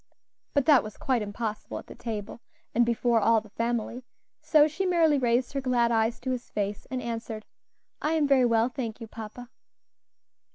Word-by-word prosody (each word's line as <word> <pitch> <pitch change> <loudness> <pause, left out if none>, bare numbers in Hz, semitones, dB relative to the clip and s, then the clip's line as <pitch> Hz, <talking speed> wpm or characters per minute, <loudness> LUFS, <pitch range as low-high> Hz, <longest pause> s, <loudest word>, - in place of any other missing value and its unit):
But 285 -2 +3
that 290 -5 +6
was 215 -1 -9
quite 255 -4 0
impossible 210 +1 -4
at - - -8
the - - -11
table, 220 -1 -6 0.3
and 240 - +4
before 235 0 +2
all 225 +1 +4
the 215 -1 -16
family; 235 +2 -2 0.4
so 300 -1 +5
she 315 +6 -3
merely 330 -5 +3
raised 245 +1 +1
her 275 - -1
glad 245 -2 +2
eyes 225 +1 +1
to 260 +1 -2
his 250 -1 -4
face 205 -1 -3
and 255 -1 -3
answered, 225 -2 -5 0.6
"I 305 - +1
am 310 -3 +2
very 270 -3 +5
well, 230 -1 +3
thank 240 -4 -5
you, 230 - -6
papa." 225 +2 -9
235 Hz, 180 wpm, -27 LUFS, 225-260 Hz, 0.6 s, that